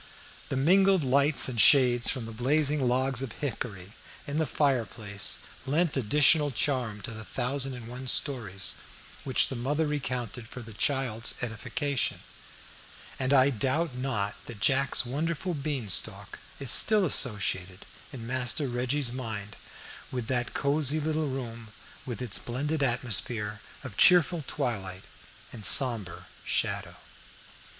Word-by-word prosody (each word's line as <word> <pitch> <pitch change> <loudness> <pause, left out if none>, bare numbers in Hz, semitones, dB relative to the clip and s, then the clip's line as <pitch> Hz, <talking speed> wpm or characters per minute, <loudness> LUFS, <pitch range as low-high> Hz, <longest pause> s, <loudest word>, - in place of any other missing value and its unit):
The 135 - -2
mingled 190 +4 +4
lights 140 +3 +4
and 120 -4 +1
shades 125 -4 +6
from 130 -4 -2
the 115 - -8
blazing 140 +4 +1
logs 130 +1 0
of 130 -5 -5
hickory 105 -8 -6 0.3
in 145 +2 -3
the 160 - 0
fireplace 110 -8 -1 0.3
lent 160 +3 +1
additional 145 +5 +3
charm 120 -4 -2
to - - -6
the 110 -1 -8
thousand 130 +3 -2
and 120 -2 -9
one 125 +2 -8
stories 100 - 0 0.5
which 130 -2 +2
the 135 - -5
mother 145 +6 -1
recounted 125 -6 -4
for 125 +1 -9
the 115 -1 -11
child's 120 -1 -1
edification, 130 +4 -2 1.0
and 130 0 -1
I 140 0 +5
doubt 135 +6 -1
not 120 -6 -3
that 115 -4 -9
Jack's 130 +4 +2
wonderful 165 +7 -3
bean 140 -6 -4
stalk 95 - 0 0.2
is 135 -4 +2
still 215 -3 +6
associated 100 - -1 0.3
in 120 -4 -8
Master 130 +3 -1
Reggie's 125 +2 -2
mind 110 -4 -6 0.6
with 125 -3 -4
that 120 -2 -2
cosy 145 +1 +1
little 155 0 -1
room 115 -4 -6 0.4
with 120 -1 -5
its 115 -6 -1
blended 145 +6 -3
atmosphere 120 -4 -1 0.2
of 120 -7 -9
cheerful 175 -2 +6
twilight 95 -6 -4 0.5
and 115 -3 -10
sombre 115 -8 +3 0.2
shadow. - - -1
130 Hz, 135 wpm, -28 LUFS, 115-145 Hz, 1.0 s, shades